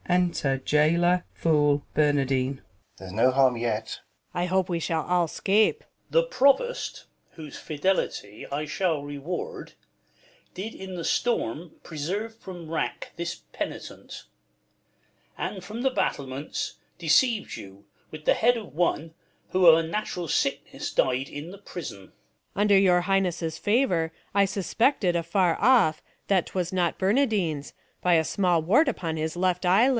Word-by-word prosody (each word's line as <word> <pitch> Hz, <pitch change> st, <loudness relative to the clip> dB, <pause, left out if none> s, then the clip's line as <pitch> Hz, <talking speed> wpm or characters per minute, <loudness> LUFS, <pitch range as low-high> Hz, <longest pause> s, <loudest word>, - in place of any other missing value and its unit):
Enter 175 Hz, -6 st, +1 dB
JAILOR, 170 Hz, +6 st, +2 dB
FooL, 145 Hz, -3 st, +2 dB
Bernardine. 140 Hz, -3 st, +1 dB
Balt. -, -, -20 dB, 0.3 s
There's 95 Hz, 0 st, -9 dB
no 115 Hz, +5 st, +4 dB
harm 130 Hz, -1 st, +4 dB
yet. 115 Hz, -2 st, -3 dB
Luc. -, -, -38 dB
I -, -, +1 dB
hope 185 Hz, 0 st, +1 dB
we 170 Hz, -2 st, -1 dB
shall 160 Hz, -1 st, -1 dB
all 180 Hz, -1 st, +2 dB
'scape! 210 Hz, -, +2 dB
Duke. -, -, -27 dB, 0.2 s
The -, -, +4 dB
Provost, 485 Hz, -, +1 dB, 0.3 s
whose 155 Hz, -4 st, -9 dB
fidelity 150 Hz, -, -2 dB
I 145 Hz, +2 st, -2 dB
shall 155 Hz, -1 st, -1 dB
Eeward, 145 Hz, +5 st, -6 dB, 0.8 s
did 210 Hz, +5 st, -6 dB
in 190 Hz, -1 st, -7 dB
the 170 Hz, -, -5 dB
storm 170 Hz, -, -1 dB
preserve 190 Hz, +9 st, -4 dB
from 180 Hz, -7 st, -10 dB
wrack 165 Hz, -, -3 dB
This 170 Hz, 0 st, -5 dB
penitent; -, -, -7 dB, 1.1 s
and 190 Hz, -3 st, -4 dB
from 215 Hz, +5 st, -6 dB
the 265 Hz, 0 st, +2 dB
battlements 140 Hz, -, -3 dB, 0.2 s
Deceived 205 Hz, +8 st, +2 dB
you 100 Hz, +1 st, -11 dB, 0.2 s
with 155 Hz, -1 st, -10 dB
the -, -, +5 dB
head 240 Hz, +2 st, +3 dB
of 220 Hz, -, -9 dB
one, 165 Hz, -1 st, 0 dB, 0.4 s
who 185 Hz, -1 st, +4 dB
of 160 Hz, -1 st, +9 dB
A 165 Hz, 0 st, -1 dB
natural 180 Hz, -2 st, -3 dB
sickness -, -, -1 dB
died 130 Hz, +1 st, +1 dB
i' 145 Hz, -, -6 dB
th' 185 Hz, +6 st, -11 dB
prison. 155 Hz, -, -7 dB
Luc. -, -, -24 dB, 0.4 s
Under 205 Hz, 0 st, +4 dB
your 180 Hz, -2 st, +4 dB
Highness' 180 Hz, -4 st, 0 dB
favour, 205 Hz, -8 st, +1 dB, 0.2 s
I 200 Hz, 0 st, +4 dB
suspected. 195 Hz, 0 st, +1 dB
Afar 170 Hz, +1 st, +1 dB
off, 225 Hz, -10 st, +4 dB, 0.3 s
that 190 Hz, -3 st, +2 dB
'twas 180 Hz, -1 st, -3 dB
not 175 Hz, -2 st, +1 dB
Bernardine's, 195 Hz, -, 0 dB, 0.3 s
by 180 Hz, -1 st, +4 dB
A 160 Hz, -1 st, +3 dB
small 180 Hz, -3 st, +2 dB
wart 250 Hz, -, +4 dB
upon 170 Hz, -9 st, -3 dB
his 160 Hz, +2 st, -3 dB
left 180 Hz, 0 st, 0 dB
eye 190 Hz, +6 st, +5 dB
lid. -, -, +3 dB
175 Hz, 150 wpm, -26 LUFS, 150-195 Hz, 1.1 s, of